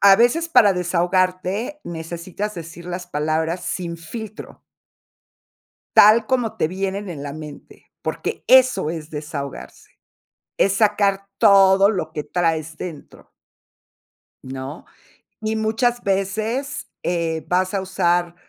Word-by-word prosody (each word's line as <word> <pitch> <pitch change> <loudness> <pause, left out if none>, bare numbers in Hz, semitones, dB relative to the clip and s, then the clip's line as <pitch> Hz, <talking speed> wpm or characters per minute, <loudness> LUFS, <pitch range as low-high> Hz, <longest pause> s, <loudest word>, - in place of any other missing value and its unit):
A 195 -1 +8
veces, 320 +9 +3
para 205 -11 +6
desahogarte, 185 - 0
necesitas 170 +5 -5
decir 170 0 -9
las 180 0 -5
palabras 160 +3 -1
sin 170 -2 -3
filtro 215 +6 -9 1.4
tal 215 +2 +7
como 245 -4 0
te - - +1
vienen 195 +2 -3
en 150 -5 -6
la 140 -1 -5
mente, 150 -1 -11 0.2
porque - - -4
eso 255 -11 +5
es 160 -2 -6
desahogarse. 150 -2 -7 0.7
Es 195 - +3
sacar 200 -2 +2
todo 195 0 +6
lo 205 -4 -2
que 150 - -5
traes 160 -2 -1
dentro 160 -5 -9 1.1
¿no? 130 +4 -7 0.6
Y 220 0 -1
muchas 230 +3 0
veces, 215 +9 -2 0.2
eh, 165 -3 -1
vas 185 +2 +1
a 195 - 0
usar 175 -2 0
185 Hz, 115 wpm, -21 LUFS, 165-210 Hz, 1.4 s, A